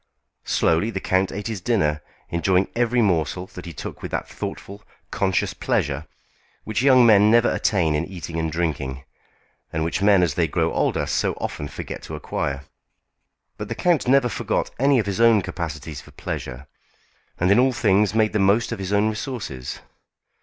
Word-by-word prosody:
Slowly 85 +7 +2
the 100 - -3
count 95 0 +1
ate 100 +1 -5
his 110 -4 -4
dinner, 80 -9 +1 0.3
enjoying 90 +2 +2
every 120 0 +2
morsel 90 -1 0
that 90 - -9
he - - -6
took - - -8
with - - -5
that - - -3
thoughtful, 100 +1 -7 0.3
conscious 95 -2 0
pleasure 70 +2 -1 0.6
which 110 +2 -2
young 130 -2 +6
men 105 -2 +6
never 120 +1 +4
attain 85 -7 +1
in 75 +2 0
eating 85 -3 -6
and 80 -1 -1
drinking, 70 -5 -2 0.7
and 80 - -1
which 85 +4 -2
men 100 -2 +5
as 85 -4 +1
they 85 +1 +1
grow - - 0
older - - 0
so - - 0
often 75 - -5
forget - - -7
to - - -7
acquire. 70 0 -3 0.9
But 105 - -5
the 115 - -4
count 170 -1 +1
never 135 -1 +4
forgot - - -2
any 140 +1 +4
of 110 - +1
his 100 +2 -2
own 115 -4 +5
capacities 80 -4 -5
for - - -16
pleasure, 65 +1 -6 0.7
and 90 +2 +2
in 100 - +5
all 130 +1 +4
things 105 -4 +2
made 110 -1 +2
the 105 - +1
most 100 +5 +3
of 115 - -4
his 95 0 -4
own 105 +1 +3
resources. 105 - -5
95 Hz, 180 wpm, -23 LUFS, 80-110 Hz, 0.9 s, young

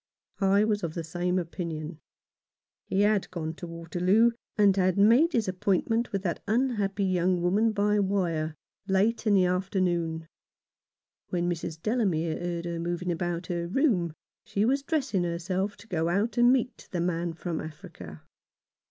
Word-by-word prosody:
I 200 +1 +4
was 210 -1 +1
of 165 -2 -4
the 170 - -3
same 175 +3 -1
opinion. 165 -3 -4 0.9
He 195 - +1
had 205 -1 +2
gone 165 -3 -4
on - - -4
to 175 +1 -8
Waterloo, 180 +7 +2 0.3
and 200 -2 +5
had 185 -1 +2
made 240 +12 +5
his 225 -4 +1
appoint 185 +3 0
ment 230 +1 +1
with 195 -1 -2
that 170 -4 -2
unhappy 215 -4 0
young 180 -1 +2
woman 200 +6 +2
by 210 0 +2
wire, 170 -6 0 0.3
late 210 +4 +1
in 205 - +5
the 185 -2 +5
afternoon. 180 -3 -1 1.0
When 175 -1 -1
Mrs. 165 -2 -3
Delamere 175 -6 0
heard 175 -1 -3
her 170 -1 -3
moving 175 +1 -2
about 175 +1 -2
her 170 0 -3
room 185 - +1 0.3
she 205 +1 0
was 275 +4 +2
dressing 275 - 0
her 170 -1 -2
self 190 +4 -2
to 205 +2 -15
go 165 -4 0
out 205 +6 0
and 240 0 +5
meet 255 -1 -1
the 180 - -3
man 170 -1 -1
from 170 -1 -4
Africa. 155 - -10
185 Hz, 165 wpm, -28 LUFS, 170-210 Hz, 1.0 s, and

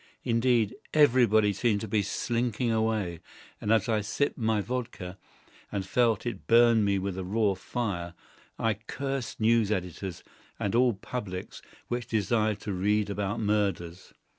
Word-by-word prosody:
Indeed, 115 -2 +2 0.2
everybody 115 -8 +5
seemed 105 -2 +1
to 110 - -4
be 105 +1 +1
slinking 120 +3 -1
away, 110 -6 0 0.4
and 105 - -1
as 110 -3 +3
I 110 -2 +1
sipped 140 +7 -1
my 110 -3 +1
vodka, 110 -5 -4 0.5
and 95 -2 -2
felt 115 +2 +2
it 115 -6 -5
burn 115 -1 +6
me 100 -1 +2
with 95 -1 -3
raw 100 +2 +1
fire, 95 -4 -4 0.4
I 110 -1 +1
cursed 130 +5 -5
news 110 -1 +3
editors 90 -1 -4 0.4
and 100 - -1
all 120 0 +4
publics 95 -3 -6 0.3
which 120 -1 -3
desired 110 -1 +1
to 105 - -3
read 105 +2 +1
about 105 +2 -2
murders. 100 -4 -1
110 Hz, 140 wpm, -28 LUFS, 100-115 Hz, 0.5 s, burn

